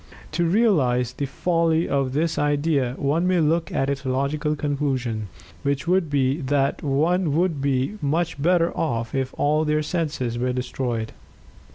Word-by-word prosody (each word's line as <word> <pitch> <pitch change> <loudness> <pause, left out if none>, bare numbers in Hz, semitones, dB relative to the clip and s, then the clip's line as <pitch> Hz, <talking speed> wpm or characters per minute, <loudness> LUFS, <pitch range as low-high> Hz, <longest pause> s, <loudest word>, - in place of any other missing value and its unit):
To 170 +2 0
realize 150 - +2
the 140 - -3
folly 165 +2 +1
of 135 -2 0
this 160 +3 0
idea, 145 -3 +1
one 155 +6 +1
may 185 -1 +3
look 160 +1 +1
at 135 - 0
its 140 0 -2
logical 140 +4 -1
conclusion, 135 -7 -2 0.3
which 140 +3 -1
would 180 -2 +2
be 140 +2 +1
that 140 +1 0
one 155 +3 +1
would 170 -1 +1
then - - -5
be 135 +7 0
much 155 +1 -1
better 170 +1 +2
off 115 -7 -2
if 135 -1 -1
all 150 +2 +2
their 155 0 +1
senses 145 -8 -2
were 125 +1 0
destroyed. 125 -3 -3
145 Hz, 160 wpm, -23 LUFS, 130-165 Hz, 0.3 s, may